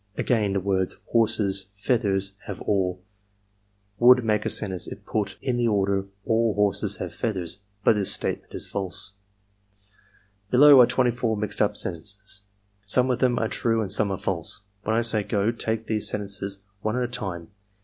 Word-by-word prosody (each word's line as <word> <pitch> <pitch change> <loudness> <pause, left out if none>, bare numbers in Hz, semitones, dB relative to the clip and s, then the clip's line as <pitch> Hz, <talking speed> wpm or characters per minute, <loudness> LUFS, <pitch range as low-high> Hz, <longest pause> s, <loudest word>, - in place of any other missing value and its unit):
" - - -34
'Again, 105 -5 +1
the 100 - +1
words 95 -1 -1 0.2
horses 100 -4 +1
feathers 100 -3 0
have - - -6
all 95 -3 -1 1.0
would 125 0 +6
make 105 -1 +1
a - - 0
sentence 95 -4 -2
if - - -9
put 100 -3 -2
in 130 -3 0
the 120 -1 +1
order 100 -2 +1 0.2
aU 115 -2 +2
horses 105 0 +1
have - - -6
feathers, 95 -6 -3 0.2
but - - +5
this 100 -3 +1
statement - - -2
is - - -2
false. 100 0 -1 0.6
" 100 0 -36
'Below 140 +2 +8
are 120 - +6
24 120 -3 0
mixed 105 -1 -3
up - - +1
sentences. 100 +3 -3 0.4
Some 125 +5 +3
of 125 - -1
them 125 -2 +2
are 110 - 0
true 115 0 0
and 100 -4 -3
some 105 0 +2
are 95 - -2
false. 100 - 0 0.2
When 110 +2 -1
I 115 - +3
say 110 -2 +3
"go," 105 +1 0
take 115 -1 -3
these 110 -1 0
sentences 100 -1 -2 0.2
one 110 +3 -1
at 125 - 0
a - - -1
time. 95 -9 -5
105 Hz, 180 wpm, -25 LUFS, 100-115 Hz, 1.0 s, Below